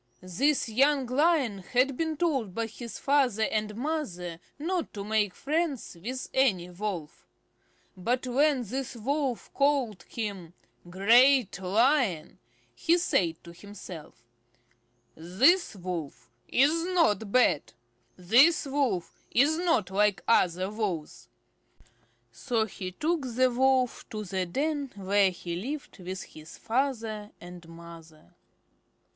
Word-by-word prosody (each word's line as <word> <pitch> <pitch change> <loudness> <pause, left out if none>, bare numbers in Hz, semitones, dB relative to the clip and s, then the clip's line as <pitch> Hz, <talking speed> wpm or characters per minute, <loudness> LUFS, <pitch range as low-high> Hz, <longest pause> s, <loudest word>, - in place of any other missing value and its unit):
This 265 - +1
young 270 +4 +2
Lion 265 - +1
had 250 +8 +1
been 320 +1 -2
told 270 - -1
by 230 - -1
his 230 +1 -8
father 265 -6 +2
and 215 -1 -1
mother 210 - -4 0.2
not 335 +3 -2
to 200 - -5
make 210 -2 0
friends 305 - -2
with 255 +4 -4
any 190 -10 +2
Wolf. 180 -5 -6 0.7
But 245 +8 -1
when 270 +1 +2
this 255 +4 -5
Wolf 265 +2 -2
called 275 -9 +1
him 195 -7 -5 0.3
"Great 235 +4 +4
Lion," 205 - +1 0.3
he 335 +1 +2
said 170 - 0
to 170 - -12
himself: 170 -9 -11 0.9
"This 225 - +2
Wolf 165 -10 -6 0.2
is 305 +6 +3
not 215 - +2
bad. 245 - +2 0.4
This 245 - +4
Wolf 270 -11 -2
is 300 +6 +3
not 325 - +1
like 205 0 +2
other 185 -3 +2
Wolves." 195 -8 -4 1.0
So 220 - -1
he 185 -3 -7
took 290 - -2
the 255 0 +3
Wolf 255 0 +1
to 215 -1 -5
the 185 -1 -3
den 285 - -2
where 200 0 +2
he 175 -1 -6
lived 270 - -6
with 185 +1 -6
his 155 +2 -13
father 225 -4 -2
and 175 -1 -12
mother. 165 - -14
225 Hz, 120 wpm, -28 LUFS, 185-275 Hz, 1.0 s, Great